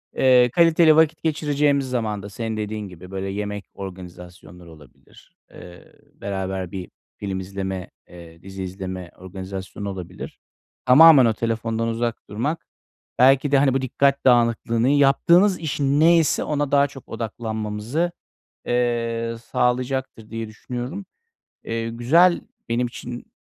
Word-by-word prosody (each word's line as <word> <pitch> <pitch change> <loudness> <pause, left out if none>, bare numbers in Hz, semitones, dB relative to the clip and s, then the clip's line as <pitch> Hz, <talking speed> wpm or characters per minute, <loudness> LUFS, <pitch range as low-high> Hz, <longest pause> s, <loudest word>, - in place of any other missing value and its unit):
eee, 125 -2 +5
kaliteli 165 -1 +5
vakit 160 0 +2
geçireceğimiz 145 -3 +1
zaman 110 -5 -2
da 100 - -8
senin 110 +1 -4
dediğin 105 -1 -4
gibi, 90 0 -13
böyle, 95 0 -4
yemek 105 0 -4
organizasyonları 90 -2 -11
olabilir, 75 -6 -19 0.2
eee, 90 0 -14 0.2
beraber 95 -2 -4
bir 95 -2 -7 0.3
film 95 -2 -4
izleme, 95 -1 -5 0.2
eee, 85 -1 -14
dizi 95 +1 -7
izleme 95 -1 -6
organizasyonu 95 +2 -7
olabilir. 90 -2 -8 0.5
Tamamen 140 +1 +8
o 115 - +2
telefondan 115 0 -2
uzak 115 0 -2
durmak, 140 +11 -3 0.5
belki 135 +2 +5
de, 140 - +5
hani, 135 -1 +3
bu 135 - 0
dikkat 140 +2 +1
dağınıklığını, 115 -1 +3
yaptığımız 170 +7 +4
iş 160 -3 -4
ne 150 +5 +4
ise 160 -2 +1
ona 145 -2 -2
daha 140 0 +4
çok 135 -2 -14
odaklanmamızı, 110 +7 -3 0.6
eee, 115 -1 -1 0.2
sağlayacaktır 125 -2 -1
diye 115 -1 -5
düşünüyorum. 125 - -6 0.6
Eee, 115 0 -3
güzel, 165 +10 +3 0.3
benim 120 +2 0
için 120 0 -8
115 Hz, 130 wpm, -22 LUFS, 95-135 Hz, 0.6 s, Tamamen